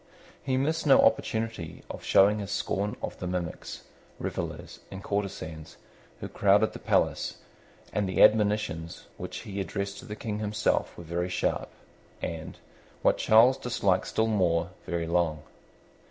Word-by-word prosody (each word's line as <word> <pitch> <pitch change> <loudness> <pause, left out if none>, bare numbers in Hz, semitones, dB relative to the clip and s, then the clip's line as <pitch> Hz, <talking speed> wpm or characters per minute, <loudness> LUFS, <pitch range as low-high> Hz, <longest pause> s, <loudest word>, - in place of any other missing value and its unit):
He 130 -1 0
missed 155 +4 0
no 135 - +7
opportunity 110 -7 0
of - - -8
showing 105 +2 +5
his 100 -1 -5
scorn 100 +1 -1
of - - -5
the 90 - -4
mimics, 90 -2 -4 0.3
revellers, 85 +1 -5
and 95 0 -8
courtesans 95 -6 -4 0.4
who - - -5
crowded 100 +2 +3
the - - -8
palace; - - +1 0.6
and 105 -2 0
the 95 - +4
admonitions 105 -6 +2
which - - -6
he 100 -3 -4
addressed 100 0 -4
to - - -11
the 105 -3 -6
King 105 -1 -4
himself 105 +1 0
were 85 - -8
very 85 +2 -2
sharp, 90 - -1 0.5
and, 80 -1 -5 0.5
what - - +3
Charles 120 +4 +6
disliked 100 -6 +1
still 110 - +1
more, 90 -7 +1 0.2
very 85 -1 -1
long. 85 -3 0
100 Hz, 145 wpm, -28 LUFS, 85-110 Hz, 0.6 s, no